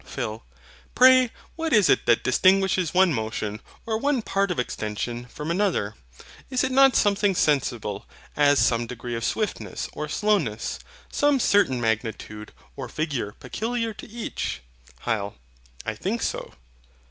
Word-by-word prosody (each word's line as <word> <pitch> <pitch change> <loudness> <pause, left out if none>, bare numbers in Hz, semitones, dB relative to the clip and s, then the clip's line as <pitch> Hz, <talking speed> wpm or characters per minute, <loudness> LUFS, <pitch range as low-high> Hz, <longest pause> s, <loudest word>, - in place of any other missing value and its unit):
PHIL. 110 +1 -5 0.5
Pray 255 -1 +7 0.3
what 325 0 -2
is 210 - +5
it - - +2
that 120 - +4
distinguishes 185 +4 +3
one 185 -2 +4
motion, 110 -2 -3 0.2
or 220 -1 -1
one 275 -2 +1
part 195 -1 0
of 180 - -2
extension, 120 0 -3
from 150 +6 -5
another? 175 - 0 0.6
Is 255 -1 +1
it 260 - 0
not 270 -1 +6
something 200 -1 +3
sensible, 120 - 0 0.3
as 145 -1 +4
some 115 -2 +2
degree 120 0 -6
of 115 0 -3
swiftness 215 - -2
or 150 - -5
slowness, 165 - 0 0.3
some 290 -1 +2
certain 200 - +3
magnitude 110 -1 -3 0.2
or 135 -3 -6
figure 140 -10 -3
peculiar 230 - -3
to - - -11
each? 225 - -4 0.4
HYL. 105 -4 -2 0.5
I - - -2
think - - -3
so. - - -4
155 Hz, 140 wpm, -25 LUFS, -, 0.6 s, Pray